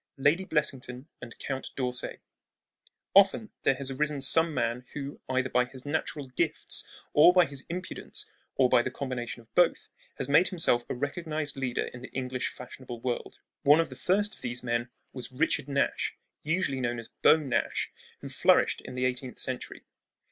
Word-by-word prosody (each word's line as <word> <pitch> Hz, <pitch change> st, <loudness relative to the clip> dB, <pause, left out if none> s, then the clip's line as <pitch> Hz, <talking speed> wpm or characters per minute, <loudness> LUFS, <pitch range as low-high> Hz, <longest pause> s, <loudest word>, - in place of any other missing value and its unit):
LADY 150 Hz, +7 st, +3 dB
BLESSINGTON 135 Hz, -5 st, -1 dB, 0.2 s
AND 120 Hz, -2 st, -9 dB
COUNT 135 Hz, -1 st, -4 dB
D'ORSAY 125 Hz, -2 st, -2 dB, 0.9 s
Often 200 Hz, +2 st, +5 dB
there 135 Hz, -, +3 dB
has 135 Hz, 0 st, -4 dB
arisen 150 Hz, +2 st, -1 dB
some 160 Hz, +5 st, +3 dB
man 125 Hz, -4 st, -1 dB
who, 140 Hz, -1 st, -6 dB
either 130 Hz, 0 st, +1 dB
by 125 Hz, 0 st, +3 dB
his 130 Hz, +1 st, -9 dB
natural 145 Hz, -1 st, -2 dB
gifts 130 Hz, -, +1 dB, 0.3 s
or 150 Hz, +4 st, +8 dB
by 180 Hz, -1 st, +6 dB
his 140 Hz, -1 st, -5 dB
impudence 180 Hz, +2 st, -6 dB, 0.3 s
or 130 Hz, -, +5 dB
by 120 Hz, -, +5 dB
the 130 Hz, -, -2 dB
combination 125 Hz, -3 st, -4 dB
of 115 Hz, -, -33 dB
both, 175 Hz, -1 st, +3 dB, 0.3 s
has -, -, -2 dB
made 150 Hz, +6 st, +5 dB
himself 140 Hz, -10 st, +1 dB
a -, -, -2 dB
recognized 150 Hz, +2 st, -2 dB
leader 130 Hz, -3 st, -1 dB
in 125 Hz, -, -9 dB
the 130 Hz, -, -8 dB
English 130 Hz, -1 st, -2 dB
fashionable 125 Hz, -1 st, -8 dB
world. 120 Hz, 0 st, -3 dB, 0.2 s
One 145 Hz, +3 st, +6 dB
of 165 Hz, -, +1 dB
the -, -, -9 dB
first 205 Hz, +3 st, +1 dB
of -, -, -14 dB
these 125 Hz, 0 st, -3 dB
men 120 Hz, 0 st, -1 dB, 0.2 s
was 125 Hz, -1 st, -6 dB
Richard 130 Hz, +1 st, 0 dB
Nash, 140 Hz, -1 st, 0 dB, 0.2 s
usually 150 Hz, -4 st, 0 dB
known 120 Hz, -1 st, -1 dB
as 115 Hz, -1 st, -8 dB
"Beau -, -, +5 dB
Nash," 140 Hz, -5 st, -1 dB, 0.3 s
who -, -, -6 dB
flourished -, -, +3 dB
in 125 Hz, -, -9 dB
the 130 Hz, 0 st, 0 dB
eighteenth 125 Hz, 0 st, -2 dB
century. 130 Hz, -1 st, -4 dB
135 Hz, 175 wpm, -29 LUFS, 125-150 Hz, 0.9 s, or